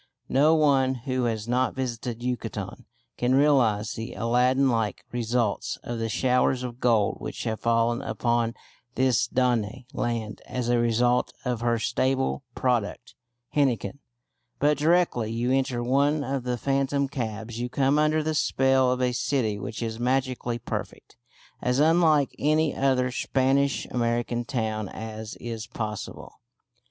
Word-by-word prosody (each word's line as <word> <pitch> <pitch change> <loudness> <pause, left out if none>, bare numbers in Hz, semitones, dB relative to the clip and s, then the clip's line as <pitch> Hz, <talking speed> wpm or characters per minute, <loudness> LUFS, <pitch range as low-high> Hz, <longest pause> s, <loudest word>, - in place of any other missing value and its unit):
No 150 +5 +4
one 135 -4 +3
who 130 0 -2
has 110 -2 -2
not 125 +2 +1
visited 120 -2 -4
Yucatan 125 -2 -4 0.3
can 125 +1 +2
realise 125 -8 +3
the 115 +2 -6
Aladdin 125 +3 +2
like 115 -4 -1
results 120 -2 -1
of 120 -1 -4
the 115 0 -2
showers 125 +2 +2
of 120 -1 -6
gold 115 -5 +2
which - - -5
have 110 -1 -2
fallen 115 +1 +1
upon 120 -3 0 0.4
this 130 -4 +2
Danaë 125 -1 0
land 115 -3 -3
as 125 -1 -3
a 120 0 +3
result 120 +1 +2
of 125 -2 -1
her 120 -1 +2
staple 130 +4 0
product, 125 0 -1 0.4
henequen; 130 -4 +1 0.6
but 150 +1 +3
directly 155 -8 +2
you 120 +2 -1
enter 130 -2 0
one 140 +4 +2
of 135 -2 -3
the 125 -1 -1
phantom 140 +2 0
cabs 115 -3 -5
you 120 +1 -2
come 135 +3 +2
under 155 +1 +2
the 155 +1 -1
spell 135 -3 +3
of 125 0 0
a 125 - +2
city 120 -4 0
which 110 +3 -5
is 110 0 -4
magically 125 -1 0
perfect; 120 - -6 0.5
as 125 +1 +1
unlike 155 -2 +4
any 155 +1 +2
other 130 -2 +1
Spanish 135 +2 +1
American 120 0 -1
town 110 -4 -2
as 110 0 -7
is 115 -2 -6
possible. 110 -3 -6
125 Hz, 145 wpm, -26 LUFS, 115-135 Hz, 0.6 s, No